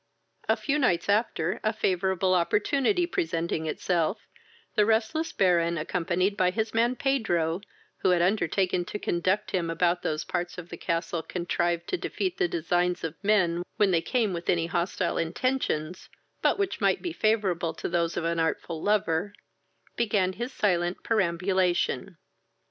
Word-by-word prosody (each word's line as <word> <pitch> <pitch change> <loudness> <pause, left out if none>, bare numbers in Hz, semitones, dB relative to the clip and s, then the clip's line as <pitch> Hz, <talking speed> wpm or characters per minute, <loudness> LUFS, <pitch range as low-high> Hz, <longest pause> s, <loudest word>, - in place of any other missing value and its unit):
A - - +5
few 300 +1 -1
nights 205 - +1
after, 200 -4 +1
a 215 - +2
favourable 190 -2 +1
opportunity 275 - +2
presenting 165 - -2
itself, 170 +4 -1 0.5
the 210 - +4
restless 225 +9 +1
Baron, 170 -3 +2
accompanied 180 +5 0
by 185 -2 +3
his 220 +3 -2
man 235 +2 +2
Pedro, 190 -11 0 0.4
who - - +1
had 180 -1 +4
undertaken 185 -1 +1
to 210 - -5
conduct 190 +2 0
him 175 -3 0
about 175 +1 +1
those 155 0 -2
parts 175 +1 -3
of 175 -1 -8
the - - -6
castle 170 0 -2
contrived 175 0 -1
to 370 - 0
defeat 370 +1 -3
the 380 - +3
designs 175 - 0
of 165 -2 -2
men 185 -5 +3 0.2
when 205 -2 +4
they 170 -2 +3
came 225 -1 0
with 170 0 -5
any 170 -2 +2
hostile 170 +1 -1
intentions, 175 -3 -1 0.3
but - - +3
which 395 -1 -2
might - - +2
be 350 -2 -3
favourable 190 - +1
to - - -4
those 170 -1 0
of - - -1
an 170 0 0
artful 160 0 -1
lover, 200 -2 +1 0.6
began 205 -5 +1
his 240 +6 -4
silent 175 -6 0
perambulation. 180 - 0
180 Hz, 155 wpm, -27 LUFS, 170-215 Hz, 0.6 s, A